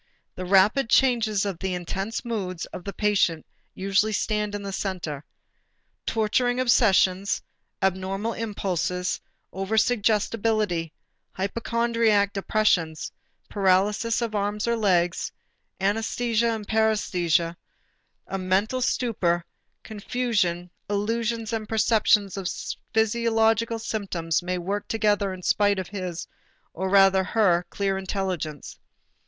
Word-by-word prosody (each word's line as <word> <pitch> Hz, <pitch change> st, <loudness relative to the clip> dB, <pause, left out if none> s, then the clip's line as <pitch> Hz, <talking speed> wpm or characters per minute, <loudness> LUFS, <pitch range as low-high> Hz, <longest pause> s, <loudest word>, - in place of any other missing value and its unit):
The 185 Hz, -, -6 dB
rapid 200 Hz, +7 st, +4 dB
changes 225 Hz, -7 st, +3 dB
of 195 Hz, -4 st, -3 dB
the 190 Hz, -1 st, -2 dB
intense 195 Hz, +7 st, -4 dB
moods 190 Hz, -7 st, -3 dB
of 180 Hz, -, -9 dB
the 200 Hz, -, -3 dB
patient 195 Hz, -7 st, +1 dB, 0.3 s
usually 195 Hz, +3 st, +1 dB
stand 210 Hz, 0 st, -1 dB
in 205 Hz, -, -5 dB
the 195 Hz, -1 st, -5 dB
center. 175 Hz, -8 st, -4 dB, 0.8 s
Torturing 245 Hz, +3 st, +1 dB
obsessions, 200 Hz, -6 st, +3 dB, 0.4 s
abnormal 190 Hz, +4 st, -1 dB
impulses, 185 Hz, -5 st, -2 dB, 0.3 s
over 195 Hz, +3 st, -2 dB
suggestibility, 215 Hz, -6 st, +1 dB, 0.4 s
hypochondriac 225 Hz, 0 st, +1 dB
depressions, 195 Hz, -6 st, 0 dB, 0.4 s
paralysis 205 Hz, +4 st, +2 dB
of 230 Hz, -2 st, -3 dB
arms 205 Hz, +1 st, -1 dB
or 235 Hz, -, +2 dB
legs, 180 Hz, -5 st, +1 dB, 0.5 s
anæsthesia 225 Hz, +3 st, 0 dB
and 210 Hz, -2 st, -7 dB
paræsthesia, 180 Hz, -7 st, +1 dB, 0.7 s
a 195 Hz, -, -4 dB
mental 195 Hz, +7 st, 0 dB
stupor 230 Hz, -8 st, +1 dB
and -, -, -49 dB
confusion, 205 Hz, -6 st, -1 dB, 0.2 s
illusions 225 Hz, +2 st, -1 dB
and 215 Hz, -2 st, -3 dB
perceptions 215 Hz, -2 st, +3 dB
of 190 Hz, -2 st, -2 dB, 0.4 s
physiological 225 Hz, 0 st, +2 dB
symptoms 195 Hz, -8 st, -2 dB
may 180 Hz, +1 st, -2 dB
work 195 Hz, +4 st, -3 dB
together 205 Hz, -3 st, +1 dB
in 185 Hz, -1 st, -8 dB
spite 205 Hz, +1 st, +2 dB
of 185 Hz, -1 st, -4 dB
his, 185 Hz, -4 st, -5 dB, 0.5 s
or 190 Hz, +2 st, -3 dB
rather 195 Hz, -1 st, +5 dB
her 180 Hz, -4 st, +2 dB
clear 195 Hz, -1 st, -1 dB
intelligence. 185 Hz, -6 st, -4 dB
205 Hz, 110 wpm, -25 LUFS, 185-225 Hz, 0.8 s, rather